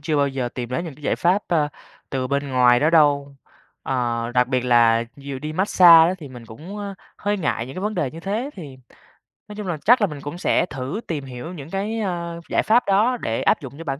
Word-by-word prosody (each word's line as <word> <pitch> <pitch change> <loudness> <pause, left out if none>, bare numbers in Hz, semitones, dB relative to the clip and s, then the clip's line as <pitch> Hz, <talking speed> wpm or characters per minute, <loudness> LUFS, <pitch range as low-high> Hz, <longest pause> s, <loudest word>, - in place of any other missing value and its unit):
chưa 155 +1 -1
bao 140 -1 +2
giờ 135 -2 -3
tìm 120 -2 -4
đến 130 +7 -3
những 160 -5 -7
cái 150 - -19
giải - - 0
pháp, 185 +4 +2
a, 155 -4 +2 0.4
từ 130 -2 -2
bên 140 +1 -2
ngoài 125 -1 +4
đó 155 - +3
đâu. 145 -3 +3 0.5
Ờ, 120 -2 -2
đặc 125 0 +3
biệt 130 -1 +1
là 115 -2 +4
dù 140 -1 -7
đi 150 +3 -5
mát-xa 175 -2 +7
á 175 +3 +1
thì 150 - -9
mình 120 -3 -12
cũng, 160 - -9
a, 200 -1 -5 0.2
hơi 205 0 -1
ngại 140 -8 -2
những 135 - -9
cái 185 - -5
vấn 210 +2 -2
đề 135 - -1
như 165 - -10
thế. 215 +9 -3
Thì 145 -8 -10 0.7
nói 210 - -9
chung 210 -3 -6
là 170 - -2
chắc 245 +2 +6
là 205 - +3
mình 150 -5 -8
cũng 145 +5 -6
sẽ - - +1
thử 135 - -5
tìm 150 -5 -4
hiểu 130 +6 -8
những 150 -4 -9
cái, 205 +5 -3
a, 175 -4 -3 0.2
giải - - +1
pháp 235 +3 +4
đó 220 +6 +3
để 115 0 -2
áp - - +2
dụng 135 0 -9
cho 165 - -8
bản 135 -3 -4
150 Hz, 250 wpm, -22 LUFS, 130-185 Hz, 0.7 s, mát-xa